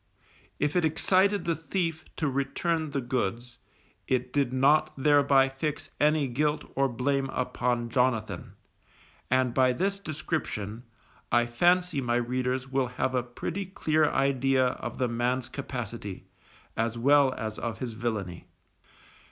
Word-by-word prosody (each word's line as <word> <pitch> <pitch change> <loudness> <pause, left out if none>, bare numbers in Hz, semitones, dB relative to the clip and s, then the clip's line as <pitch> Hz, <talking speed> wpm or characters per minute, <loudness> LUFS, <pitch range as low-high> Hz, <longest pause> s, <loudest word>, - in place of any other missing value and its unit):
If 150 +2 0
it 180 - +3
excited 185 +5 +2
the 170 - +2
thief 165 -1 -2
to 155 - -1
return 150 +4 -1
the 140 -1 -2
goods, 120 -1 -3 0.5
it 125 -1 -1
did 140 -4 +1
not 145 +4 +3
thereby 140 -1 +4
fix 140 +3 -4
any 150 -1 +3
guilt 150 +4 0
or 135 0 +2
blame 135 +2 0
upon 125 -2 -1
Jonathan; 125 -3 0 0.8
and 130 -1 +2
by 130 -1 +4
this 195 +7 -1
description, 130 - -4 0.5
I 120 0 +4
fancy 175 +5 +2
my 120 -2 0
readers 125 +2 -1
will 135 -1 0
have 130 +2 -2
a 125 - +2
pretty 165 +10 -5
clear 155 -5 +1
idea 135 -1 +2
of - - -6
the 125 - +1
man's 120 +2 -1
capacity, 115 -7 -6 0.5
as 115 +1 -1
well 140 +2 +5
as 110 -2 -5
of 115 -2 -3
his 120 -3 -4
villainy. 110 -7 -4
130 Hz, 135 wpm, -28 LUFS, 120-150 Hz, 0.8 s, well